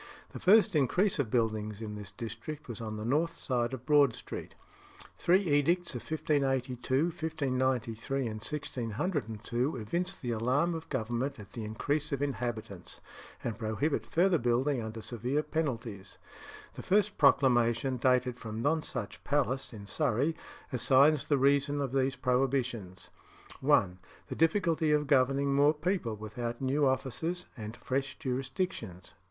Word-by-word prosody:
The - - -7
first 210 0 +5
increase 175 +7 +2
of 130 -6 0
buildings 110 -3 0
in 110 -2 -5
this 105 -2 -7
district 115 +8 -7
was 120 -2 -6
on 110 -1 -4
the 105 - -5
north 155 +7 +1
side 120 -2 -1
of 130 -1 -7
Broad 145 -4 +5
Street. - - -8 0.6
Three 185 +3 +3
edicts 170 +1 +2
of 120 - -4
1582, 135 -3 0
1593, 130 -6 -1
and 120 - -1
1602 120 - -2
evince 175 - -1
the 120 -8 -4
alarm 130 +9 +1
of 165 0 -6
Government 120 +1 -2
at 105 0 -11
the 115 - -6
increase 140 +8 -2
of 140 0 -1
inhabitants 120 -9 -4 0.4
and 115 -1 -3
prohibit 115 +7 -1
further 175 0 +3
building 125 +2 +1
under 110 0 -6
severe 125 +5 -1
penalties. 120 -12 -3 0.6
The - - -7
first 205 +1 +1
proclamation, 130 -2 +4
dated 125 0 +2
from 110 -1 -6
Nonsuch 135 -8 -2
Palace, 135 -2 0
in 105 -4 -9
Surrey, 140 +5 0 0.4
assigns 135 +4 +4
the 145 - +3
reason 140 +1 +3
of 140 -3 -1
these 135 0 +1
prohibitions: 125 -8 -1 0.5
1. 90 -1 +3 0.3
The - - -4
difficulty 165 -2 +2
of 150 0 +3
governing 140 0 +3
more 145 +2 +4
people 155 - -1
without 115 +3 -5
new 135 +2 +2
officers 150 +7 -1
and 110 0 -7
fresh 135 +1 -2
jurisdictions. 130 - -4
130 Hz, 140 wpm, -31 LUFS, 115-150 Hz, 0.6 s, first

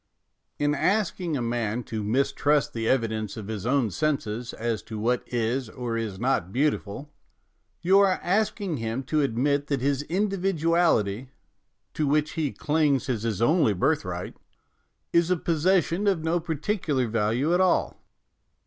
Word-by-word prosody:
In 145 0 +1
asking 180 -2 0
a 125 - -2
man 115 0 -1
to 110 -2 -4
mis 125 +7 +1
trust 145 -2 +1
the 115 -1 -1
evidence 110 -5 -1
of 105 -1 -7
his 110 0 -4
own 125 -5 +2
senses 125 -6 -2
as 115 -2 -2
to 110 - -8
what 120 +3 +1
is 120 +1 -1
or 120 -1 -4
is 110 -4 -3
not 120 -7 0
beautiful, 140 +1 -1 0.7
you 190 +3 +5
are 195 -2 +3
ask 215 +5 +1
ing 185 -7 -2
him 115 +3 -3
to 155 +3 0
admit 140 +3 0
that 140 -2 0
his 140 +1 +1
individuality, 165 - +1 0.6
to 150 - -1
which 150 +1 +1
he 155 -4 -1
clings 145 -3 +1
as 115 -5 -1
his 115 -2 -1
only 155 - +3
birthright, 90 - -1 0.8
is 170 0 +3
a 180 - +2
possession 170 +3 +1
of 185 -5 +1
no 165 +2 +1
particular 160 - -1
value 115 +7 0
after 180 - +3
all. 185 -1 +1
140 Hz, 155 wpm, -26 LUFS, 115-165 Hz, 0.8 s, you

